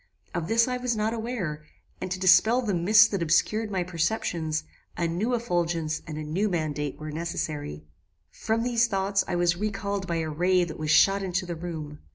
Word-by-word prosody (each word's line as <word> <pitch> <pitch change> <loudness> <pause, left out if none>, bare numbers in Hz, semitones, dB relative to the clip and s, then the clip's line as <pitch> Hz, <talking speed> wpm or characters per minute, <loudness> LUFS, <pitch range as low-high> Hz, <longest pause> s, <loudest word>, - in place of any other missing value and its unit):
Of 170 -2 -2
this 230 +2 +3
I 250 0 -1
was 250 -2 -1
not 215 +1 0
aware, 220 -10 -4 0.4
and 185 - -3
to 185 0 -3
dispel 215 +7 +5
the 210 -4 -1
mist 205 +5 +5
that 200 -4 -1
obscured 210 +7 +1
my 190 -3 -1
perceptions, 170 -3 -1 0.3
a 170 - 0
new 205 +9 0
effulgence 170 -7 -1
and 155 -1 -6
a 155 - -4
new 180 +8 -1
mandate 150 -5 -2
were 155 0 -6
necessary. 150 - -4 0.5
"From 225 - -1
these 240 -1 +2
thoughts 195 -1 0
I 175 - -1
was 175 0 +2
recalled 200 -1 -3
by 170 - -1
a 160 - -3
ray 180 +3 +2
that 165 -3 -6
was 155 -1 -3
shot 195 +5 +5
into 185 0 -2
the 175 -1 -4
room. 160 -3 -6
180 Hz, 195 wpm, -26 LUFS, 160-215 Hz, 0.5 s, dispel